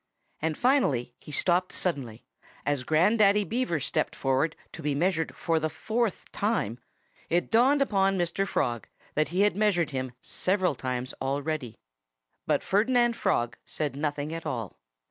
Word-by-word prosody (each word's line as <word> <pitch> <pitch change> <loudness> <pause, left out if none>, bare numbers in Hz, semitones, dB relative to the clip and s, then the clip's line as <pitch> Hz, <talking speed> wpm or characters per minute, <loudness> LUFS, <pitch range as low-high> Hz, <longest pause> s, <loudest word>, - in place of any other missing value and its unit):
And 160 0 -1
finally 150 - +2
he - - -11
stopped 180 +3 +2
suddenly. 130 -11 -3 0.4
As 145 -3 0
Grandaddy 200 - +4
Beaver 230 -7 0
stepped 145 - -1
forward 135 +4 +1 0.2
to - - -9
be 145 -2 0
measured 165 +1 0
for 165 -1 +1
the 155 0 -1
fourth 225 +4 -2
time 200 - -1 0.5
it 175 +1 +1
dawned 265 +5 +5
upon 195 -5 +2
Mr. 175 +3 0
Frog 120 - -1 0.3
that 155 +1 +2
he 180 +4 0
had 205 -2 +3
measured 195 -7 +2
him 130 -2 -3
several 185 +4 +1
times 125 0 -3
already. 140 -3 -2 0.7
But - - +2
Ferdinand 240 +3 +3
Frog 120 - 0
said 150 -3 -3
nothing 145 +1 -2
at 165 - -5
all. 120 -9 -4
160 Hz, 145 wpm, -28 LUFS, 140-200 Hz, 0.7 s, dawned